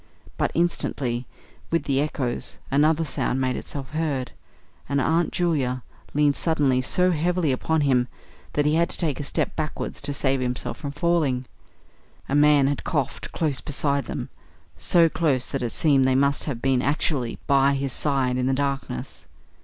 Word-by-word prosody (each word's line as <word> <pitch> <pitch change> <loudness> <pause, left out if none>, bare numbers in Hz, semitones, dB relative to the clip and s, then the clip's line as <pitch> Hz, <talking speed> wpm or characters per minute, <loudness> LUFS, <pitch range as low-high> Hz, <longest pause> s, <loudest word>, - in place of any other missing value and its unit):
But, - - 0
instantly, 130 -7 -1 0.4
with 165 - +1
the 135 -1 +1
echoes, 135 -5 -2
another 155 +3 +3
sound 135 -3 -1
made 130 -1 0
itself 135 -3 -6
heard, 150 -5 -2 0.6
and 140 0 +1
Aunt 165 +5 +1
Julia 135 -8 0 0.3
leaned 145 -1 +3
suddenly 145 -6 +2
so 180 +8 +2
heavily 170 -1 +1
upon 160 +5 0
him 130 -4 +2 0.5
that 145 - +1
he 150 - +3
had 170 +1 +2
to - - -3
take 155 -6 -1
a - - -3
step 140 - -1
backwards 155 -2 -4
to 140 - -2
save 135 -1 0
himself 125 -1 -3
from 145 - -4
falling. 150 -4 0 0.8
A - - -3
man 145 -1 +5
had 140 0 -1
coughed 140 -4 -2
close 145 -7 +2
beside 140 -1 0
them - - -5 0.5
so 170 -1 +4
close 145 -6 0
that 135 - -2
it 120 - -1
seemed 140 0 +3
they 130 0 +3
must 140 +1 +2
have 125 -6 -4
been 130 -2 +2
actually 135 -3 0
by 140 0 +4
his 135 -2 -2
side 135 -4 +1
in 125 0 0
the 135 - +2
darkness. 140 - -4
140 Hz, 170 wpm, -24 LUFS, 130-155 Hz, 0.8 s, man